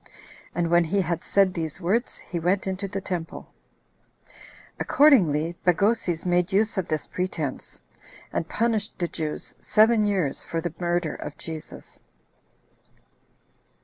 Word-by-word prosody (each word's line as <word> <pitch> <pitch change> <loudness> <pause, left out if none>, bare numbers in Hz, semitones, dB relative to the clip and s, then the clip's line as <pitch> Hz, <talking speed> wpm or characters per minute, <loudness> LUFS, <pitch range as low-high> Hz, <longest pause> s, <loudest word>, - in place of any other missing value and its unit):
And 170 -1 0
when 175 0 +5
he 195 +5 +1
had 170 -2 -2
said 195 -2 +3
these 160 -1 -4
words, 205 +7 0
he 175 - -5
went 180 +4 +1
into 190 +1 -3
the 195 0 -4
temple. 175 -4 -5 1.3
Accordingly, 175 - +4
Bagoses 180 -2 +1
made 180 0 +2
use 210 +3 +2
of 190 -3 -1
this 155 -1 -1
pretense, 165 -7 -4 0.5
and 165 - -2
punished 225 -2 0
the 175 - -1
Jews 155 -2 -4
seven 215 0 +4
years 185 -9 0
for 165 - -3
the 170 -1 -4
murder 175 -2 0
of 150 - -7
Jesus. 160 -2 -9
175 Hz, 130 wpm, -25 LUFS, 165-200 Hz, 1.3 s, when